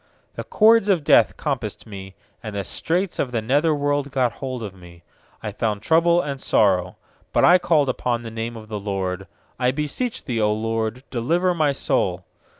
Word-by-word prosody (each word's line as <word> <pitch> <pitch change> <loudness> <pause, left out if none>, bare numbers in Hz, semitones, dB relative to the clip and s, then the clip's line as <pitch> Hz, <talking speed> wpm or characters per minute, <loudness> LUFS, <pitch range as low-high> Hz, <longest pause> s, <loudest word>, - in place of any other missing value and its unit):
3The - - -7
cords 220 -1 +5
of 180 -6 +2
death - - +4
compassed 125 -8 -4
me, 95 -3 -10 0.3
And 110 -2 -7
the 100 - -2
straits 175 - -2
of 135 - 0
the 120 -2 -1
nether 140 +9 +1
worlc 145 -1 -1
got 130 -3 +1
hold 130 0 -6
upon 95 -3 -8
me; 85 -1 -15 0.4
I - - -3
found 105 -2 -2
trouble 170 +3 +4
and 140 -4 -5
sorrow. 90 -3 +2 0.4
4But - - +4
I 180 +1 +7
called 155 -5 +2
upon 120 -2 -1
the 115 - -7
name 115 +1 -5
of 110 -1 -11
th* 105 -2 -5
LORD: 95 -2 -3 0.3
'I 125 -1 +2
beseech 150 - -3
Thee, 125 -4 -2
0 105 -1 +2
LORD, 115 +2 -2
delivei 170 +9 +1
my 155 -3 +2
soul. 135 - -1
125 Hz, 185 wpm, -22 LUFS, 105-150 Hz, 0.4 s, I